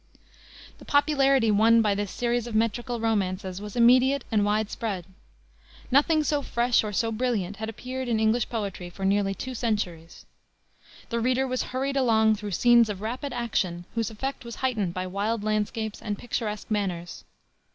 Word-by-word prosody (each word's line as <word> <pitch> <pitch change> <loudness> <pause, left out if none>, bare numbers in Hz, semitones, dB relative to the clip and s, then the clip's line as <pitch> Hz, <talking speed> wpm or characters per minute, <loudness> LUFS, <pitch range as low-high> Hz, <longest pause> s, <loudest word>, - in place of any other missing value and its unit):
The - - -13
popularity 275 -5 +3
won 225 +2 +5
by 210 -2 +2
this 205 0 -2
series 240 +2 -1
of 230 - -5
metrical 235 +2 0
romances 190 -4 -1
was 210 -1 -8
immediate 255 +3 +5
and 210 -2 +3
wide 210 +1 0
spread. 200 -6 -3 0.9
Nothing 305 +4 +4
so 295 -1 0
fresh, 240 -3 +1
or 210 - -3
so 225 +3 0
brilliant, 215 -5 -1
had 220 +1 -4
appeared 255 +3 -5
in 230 -2 +1
English 220 +2 +2
poetry 200 -6 -4
for 190 +2 -6
nearly 195 0 +1
two 255 +7 -6
centuries. 195 -8 -3 0.8
The 235 - -1
reader 255 +3 +1
was 255 -1 -1
hurried 270 +2 -2
along 220 -4 +3
through 210 0 -6
scenes 235 +4 +4
of 200 -2 -5
rapid 250 +6 -4
action, 195 -8 -2
whose 230 -3 -1
effect 265 +5 -5
was 235 -1 -7
heightened 210 -9 -1
by 185 0 -2
wild 205 +4 -2
landscapes 215 +1 -2
and 205 -2 -3
picturesque 215 -3 -4
manners. 180 -5 -3
220 Hz, 165 wpm, -26 LUFS, 205-245 Hz, 0.9 s, won